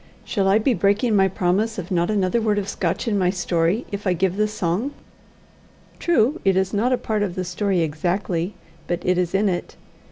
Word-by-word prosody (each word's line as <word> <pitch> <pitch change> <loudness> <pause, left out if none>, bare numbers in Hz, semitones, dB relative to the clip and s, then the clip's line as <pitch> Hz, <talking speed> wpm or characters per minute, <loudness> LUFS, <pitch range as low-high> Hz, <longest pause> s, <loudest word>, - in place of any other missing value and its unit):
Shall 195 -3 0
I 195 +2 +5
be 235 +4 +2
breaking 205 +4 +2
my 195 -1 +5
promise 190 +4 0
of 185 0 -6
not 175 -1 +1
a 205 +1 +1
word 215 -2 +1
of 200 -1 -1
Scotch 185 +2 -2
in 205 -3 +1
my 180 -1 +2
story, 175 +3 0
if 200 0 -4
I 185 - +3
give 180 +1 0
the 215 +1 +2
song? 210 +7 -2 1.0
True 310 -3 +2
it 195 -1 +3
is 190 0 0
not 225 +5 +1
a 255 - +3
part 215 -3 -2
of 190 -4 -1
the 185 - -2
story 185 0 0
exactly, 175 +3 -1 0.3
but 175 0 -3
it 180 0 +2
is 180 +1 -1
in 205 +2 +3
it. 175 -2 -3
195 Hz, 210 wpm, -22 LUFS, 180-210 Hz, 1.0 s, I